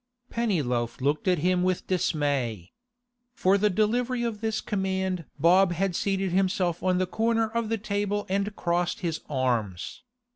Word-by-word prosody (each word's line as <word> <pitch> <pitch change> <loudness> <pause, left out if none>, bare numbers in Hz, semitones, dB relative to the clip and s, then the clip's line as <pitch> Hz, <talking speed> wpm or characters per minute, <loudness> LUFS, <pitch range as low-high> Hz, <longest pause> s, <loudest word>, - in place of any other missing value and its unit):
Pennyloaf 130 - -1
looked 145 +6 0
at 180 -1 +4
him 180 0 +3
with 185 0 0
dismay. 140 - -1 0.6
For 190 -4 +3
the 210 +1 +3
delivery 240 +5 +1
of 225 -3 -3
this 220 -1 -1
command 190 -4 -2
Bob 175 +4 +5
had 185 +1 -1
seated 195 -1 0
himself 185 -2 +1
on 185 -1 +2
the 185 - +2
corner 225 +3 +1
of 230 -1 -1
the 225 - 0
table 205 0 -2
and 200 +2 -1
crossed 175 0 -1
his 165 -3 -2
arms. 120 -10 -1
185 Hz, 150 wpm, -27 LUFS, 165-205 Hz, 0.6 s, Bob